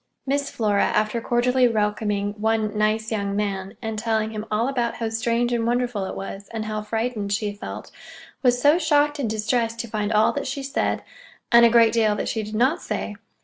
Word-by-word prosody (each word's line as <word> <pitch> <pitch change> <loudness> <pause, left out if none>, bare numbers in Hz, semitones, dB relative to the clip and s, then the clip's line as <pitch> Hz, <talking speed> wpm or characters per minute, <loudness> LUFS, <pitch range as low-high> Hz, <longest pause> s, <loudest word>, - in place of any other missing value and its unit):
Miss 280 +1 0
Flora, 210 -3 +1
after 215 +2 0
cordially 250 +2 +3
welcoming 210 -2 0
one 220 -1 +1
"nice 215 +1 0
young 200 -2 -1
man," 200 0 -3
and 220 -1 -3
telling 220 -1 0
him 215 0 -6
all 215 +3 +1
about 245 -4 -1
how 225 -1 -2
strange 235 +1 0
and 230 -1 0
wonderful 240 -4 0
it - - -5
was, 195 +1 -7
and 220 -1 -4
how 215 0 -3
frightened 220 -1 -2
she 205 0 -1
felt, 205 - -8 0.5
was 245 -2 +3
so 290 +6 +5
shocked 295 -2 +2
and 245 -6 -1
distressed 225 +2 0
to 235 - -7
find 210 -1 -2
all 215 0 +4
that 285 - -3
she 275 +1 -4
said 275 - -1 0.5
(and 235 -1 +8
a - - +3
great 230 -1 +5
deal 220 -2 +3
that - - -2
she 220 - -1
did 215 0 -6
not 265 +10 +2
say!) 210 - -3
225 Hz, 200 wpm, -23 LUFS, 210-245 Hz, 0.5 s, and